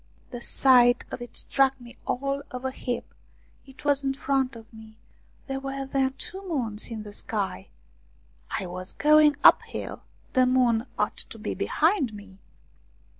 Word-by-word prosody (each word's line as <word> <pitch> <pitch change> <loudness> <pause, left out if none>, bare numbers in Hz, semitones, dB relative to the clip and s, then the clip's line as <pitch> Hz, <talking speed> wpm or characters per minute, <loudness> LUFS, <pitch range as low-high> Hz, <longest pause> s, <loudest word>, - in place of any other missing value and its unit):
The 245 -2 -6
sight 245 -1 +4
of - - -6
it 240 -1 -8
struck 270 -1 +2
me 240 -1 -13
all 275 +2 -1
of 255 +1 -7
a 260 - 0
heap. 245 -2 -5 0.5
It 270 +2 -15
was 285 -1 +2
in 270 0 0
front 270 -2 0
of 225 -1 -11
me! 220 0 -13 0.5
There 270 -2 -3
were 270 0 -4
then 265 -1 0
two 380 +7 -2
moons 230 -9 -3
in 220 -2 -5
the 205 -1 -10
sky! 195 - -3 0.8
I 195 - -3
was 185 +1 -6
going 300 0 +5
uphill; - - +3 0.3
the 255 -1 +4
moon 250 -2 +2
ought - - 0
to - - -4
be - - -4
behind 310 - +1
me 200 -2 -12
255 Hz, 160 wpm, -26 LUFS, 225-275 Hz, 0.8 s, going